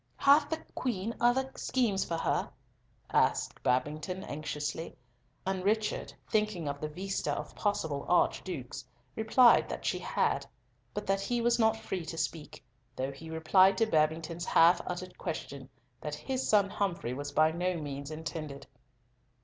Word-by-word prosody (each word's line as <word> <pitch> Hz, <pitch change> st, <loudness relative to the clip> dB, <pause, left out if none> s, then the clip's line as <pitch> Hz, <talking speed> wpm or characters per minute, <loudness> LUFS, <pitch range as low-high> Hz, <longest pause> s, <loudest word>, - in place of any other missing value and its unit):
"Hath 290 Hz, +1 st, +5 dB
the 320 Hz, -, -1 dB, 0.2 s
Queen 230 Hz, -3 st, -2 dB
other 260 Hz, +2 st, +2 dB
schemes 220 Hz, -7 st, 0 dB
for 165 Hz, -, -3 dB
her?" -, -, 0 dB, 0.6 s
asked -, -, +2 dB
Babington, 150 Hz, +9 st, -1 dB
anxiously; 150 Hz, +2 st, -4 dB, 0.5 s
and 190 Hz, -1 st, -1 dB
Richard, 215 Hz, +2 st, 0 dB, 0.2 s
thinking 210 Hz, -7 st, 0 dB
of 140 Hz, 0 st, -4 dB
the 155 Hz, -, -1 dB
vista 190 Hz, +5 st, -2 dB
of -, -, -5 dB
possible 160 Hz, -9 st, -1 dB
archdukes, 140 Hz, -8 st, 0 dB, 0.3 s
replied 230 Hz, +2 st, +5 dB
that -, -, -5 dB
she -, -, 0 dB
had; -, -, 0 dB, 0.5 s
but 205 Hz, -, -3 dB
that 195 Hz, 0 st, +1 dB
he 240 Hz, +4 st, -1 dB
was 235 Hz, +1 st, +2 dB
not 220 Hz, -1 st, +4 dB
free 190 Hz, -5 st, -4 dB
to 165 Hz, -, -5 dB
speak, 160 Hz, -2 st, -4 dB, 0.3 s
though 130 Hz, +1 st, -2 dB
he 160 Hz, +4 st, -10 dB
replied 185 Hz, +4 st, +4 dB
to 225 Hz, -, +4 dB
Babington's 165 Hz, -1 st, 0 dB
half 170 Hz, +2 st, +5 dB
uttered 180 Hz, +1 st, -5 dB
question -, -, -5 dB, 0.3 s
that -, -, -4 dB
his 265 Hz, -1 st, -3 dB
son 200 Hz, -2 st, +4 dB
Humfrey 190 Hz, -, -1 dB
was 145 Hz, +2 st, -5 dB
by 155 Hz, +2 st, +4 dB
no 180 Hz, +2 st, -1 dB
means 140 Hz, -2 st, -5 dB
intended. 155 Hz, -2 st, -6 dB
180 Hz, 150 wpm, -31 LUFS, 155-215 Hz, 0.6 s, Hath